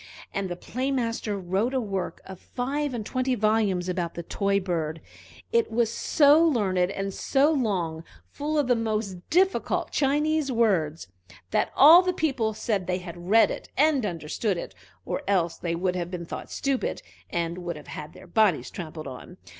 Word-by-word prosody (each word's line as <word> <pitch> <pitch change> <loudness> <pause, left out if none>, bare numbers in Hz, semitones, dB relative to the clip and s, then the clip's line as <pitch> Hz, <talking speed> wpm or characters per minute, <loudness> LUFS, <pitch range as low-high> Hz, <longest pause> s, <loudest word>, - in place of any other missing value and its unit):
And 195 -1 -2
the 175 - -3
Play 255 +9 -3
master 230 -5 -1
wrote 195 +7 -1
a - - +3
work 195 -6 -4
of 190 -1 -9
five 275 +2 -3
and 220 -3 -4
twenty 255 +2 0
volumes 215 -5 +1
about 175 -2 -2
the 170 - -5
toy 200 +3 0
bird: 165 -4 -2 0.5
it 465 -1 +2
was 230 0 +1
so 300 +1 +5
learned 195 - +2
and 195 0 -3
so 280 +8 +2
long, 185 - -1 0.2
full 300 +2 -3
of 295 - +3
the 245 0 +3
most 215 -4 -2
difficult 380 +4 +1
Chinese 295 +1 +1
words, 180 - +1 0.4
that - - +1
all 320 +6 +9
the 365 0 0
people 260 -10 0
said 205 -6 -1
they 180 -1 0
had 175 -1 -9
read 225 +2 +6
it - - -7
and 290 -3 +3
understood 175 +2 -2
it, 95 - -6 0.3
or - - -2
else 175 -4 +1
they 170 -1 -2
would 180 +1 -1
have 175 -1 -3
been 175 -2 -5
thought - - -7
stupid, 275 -2 -2 0.3
and 170 +1 -2
would 175 -1 -4
have 150 - -11
had 150 - -8
their - - -13
bodies 180 - +2
trampled 160 -3 -7
on. 130 -2 -9
205 Hz, 180 wpm, -26 LUFS, 175-260 Hz, 0.5 s, all